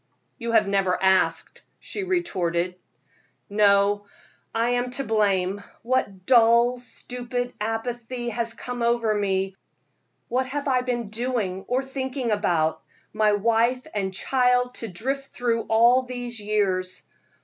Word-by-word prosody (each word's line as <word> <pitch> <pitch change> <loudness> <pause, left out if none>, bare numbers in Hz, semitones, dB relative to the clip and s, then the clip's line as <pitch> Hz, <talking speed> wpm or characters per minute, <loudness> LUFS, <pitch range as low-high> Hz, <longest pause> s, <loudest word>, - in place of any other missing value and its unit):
"You 235 -1 -3
have 215 -3 +4
never 195 -2 +1
asked," 190 0 +2 0.2
she 415 - -6
retorted. 185 - -1 0.7
"No, 205 0 +3 0.4
I 230 +1 +1
am 245 0 0
to 275 - -1
blame. 200 -4 +1 0.2
What 200 -7 -1
dull, 235 +1 +5
stupid 245 0 -5
apathy 240 +2 -3
has 230 0 -2
come 245 -1 -6
over 235 -2 +2
me? 195 -2 0 0.7
What 255 +2 0
have 285 +2 -3
I 255 -2 +3
been 240 -4 -2
doing 220 -5 -2
or 255 +2 0
thinking 265 -2 -3
about? 170 -7 +1 0.3
My 215 -1 +3
wife 230 +4 +2
and 195 -2 -1
child 250 +4 +1
to 230 - -3
drift 270 +9 -3
through 230 -2 0
all 235 +3 +5
these 245 -2 -6
years. 195 -3 -1
230 Hz, 125 wpm, -25 LUFS, 200-250 Hz, 0.7 s, dull